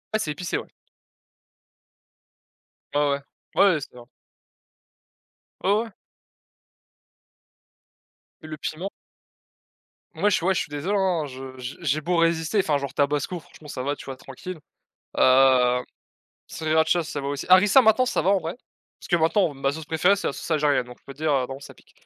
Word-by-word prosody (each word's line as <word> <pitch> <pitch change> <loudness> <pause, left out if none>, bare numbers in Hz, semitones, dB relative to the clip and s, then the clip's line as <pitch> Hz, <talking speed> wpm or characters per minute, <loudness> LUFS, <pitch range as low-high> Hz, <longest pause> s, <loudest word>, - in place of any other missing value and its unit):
Ah! - - +2
C'est 150 - -2
épicé, 170 +3 -3
ouais. - - -6 2.3
Ouais, 145 - +3
ouais, 140 -1 +1 0.4
ouais 185 -6 +4
c'est - - -10
vrai. 120 -1 -12 1.6
Ouais, 195 - +3
ouais. 230 - -11 2.5
Le 155 -1 -8
piment. 160 +5 -4 1.3
Moi, 205 - +2
je 200 - +3
suis 170 - -2
ouais, 190 - +3
je - - 0
suis - - -6
désolé, 150 +8 -2
hein, 180 -5 +1
je 130 -1 -9
j'ai 125 +1 -6
j'ai 155 -1 0
beau 175 +3 0
résister, 165 +4 +2
enfin, 155 -6 +2
genre, 140 0 -5
tabasco, 145 +4 0
franchement, 155 -1 -16
ça 130 -3 -5
va, 145 +2 -1
tu - - -12
vois, 135 -1 -6
tranquille, 155 +7 -9 0.6
heu, 130 -1 +5 0.6
sriracha, 160 +2 +1
ça 150 -2 -5
va 140 - -5
aussi 140 0 -3
harissa, 195 +7 +7
maintenant, 245 +3 +4
ça - - 0
va 190 - +2
en 200 - +4
vrai, 165 0 -5 0.5
parce - - -11
que, 175 - +3
maintenant, 165 +1 +2
ma 135 0 -1
sauce 160 +1 -7
préférée 165 +5 +3
c'est 200 - -2
la - - -2
sauce - - -8
algérienne, 145 -4 +2
donc 125 0 -12
je - - -40
peux 140 - -10
dire, 155 +1 0
heu, 130 -2 +1
bon, 135 - -6
ça 140 - -12
pique, - - -24
155 Hz, 175 wpm, -24 LUFS, 140-180 Hz, 2.5 s, harissa